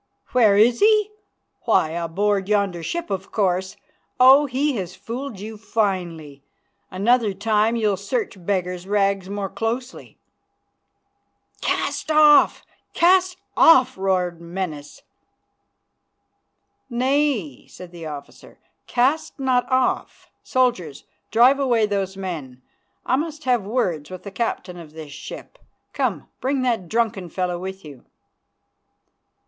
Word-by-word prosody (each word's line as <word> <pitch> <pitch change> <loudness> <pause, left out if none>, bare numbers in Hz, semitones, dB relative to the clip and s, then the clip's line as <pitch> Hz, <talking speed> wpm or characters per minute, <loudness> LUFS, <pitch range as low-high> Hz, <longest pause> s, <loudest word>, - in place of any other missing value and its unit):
"Where 220 -5 +4
is 235 +3 +4
he? 425 0 +4 0.5
Why, 155 - +2
aboard 190 +4 -1
yonder 200 -5 +1
ship, 335 - -4
of 195 0 -4
course. 190 -2 -1 0.4
Oh! 270 +3 +7
he 275 +2 0
has 185 -1 -5
fooled 230 +3 -6
you 215 +1 -8
finely. 175 -10 -3 0.5
Another 210 +2 +1
time 215 +2 +1
you'll 210 -4 +1
search 405 - -4
beggar's 180 -1 -2
rags 195 -2 0
more 200 -1 -3
closely." 230 +6 -5 1.4
"Cast - - -2
off! 305 -1 +5 0.3
Cast 365 +1 +3 0.2
off!" 265 -6 +6
roared 180 -3 -1
Menas. 170 -4 -6 1.9
"Nay," 255 - 0
said 180 -1 -12
the 170 -2 -8
officer, 145 -2 -10 0.3
"cast 275 +5 0
not 260 -1 +1
off. 255 0 -1
Soldiers, 190 - -1 0.3
drive 250 +5 +5
away 240 -5 +2
those 195 -2 -2
men. 150 -10 -6 0.4
I 260 - +2
must 310 +1 -4
have 245 -6 +1
words 180 - -1
with 185 -1 -9
the 200 - -8
captain 190 -5 -3
of 155 -3 -12
this 155 -2 -9
ship. 150 - -10 0.3
Come, - - -2
bring 265 0 -1
that 225 -9 -1
drunken 215 -6 -1
fellow 180 0 -2
with 190 0 -7
you." 140 -5 -12
205 Hz, 120 wpm, -22 LUFS, 180-255 Hz, 1.9 s, Oh